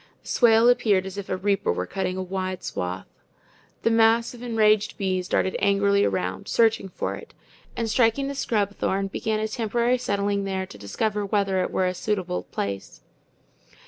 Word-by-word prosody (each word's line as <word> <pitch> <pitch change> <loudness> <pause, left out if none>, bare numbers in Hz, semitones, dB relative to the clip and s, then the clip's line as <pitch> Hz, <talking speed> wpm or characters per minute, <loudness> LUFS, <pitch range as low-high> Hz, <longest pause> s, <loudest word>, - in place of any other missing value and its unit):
The - - -11
swale 230 -1 +5
appeared 210 -6 +3
as 190 +1 -6
if 200 - -8
a 185 - -1
reaper 200 +1 +1
were 90 +1 -2
cutting 185 - -3
a 190 - -2
wide 185 0 -4
swath. 90 +1 -4 0.8
The 230 - +3
mass 225 +1 +3
of 240 - -12
enraged 215 -3 +2
bees 185 -3 -1
darted 190 - 0
angrily 200 0 +3
around, 95 -1 -2
searching 225 -4 +2
for - - -3
it, - - -11 0.4
and 230 - -1
striking 230 +4 +2
the 280 - -3
scrub 210 -7 -1
thorn, 195 +1 -1
began 215 +2 -2
a 215 - -1
temporary 235 +3 0
settling 200 -2 -1
there 190 -1 -2
to 105 - -12
discover 205 - -2
whether 195 -2 +1
it - - -1
were 185 - 0
a 180 - 0
suitable 185 -2 -2
place. 100 -1 -5
200 Hz, 175 wpm, -25 LUFS, 185-225 Hz, 0.8 s, swale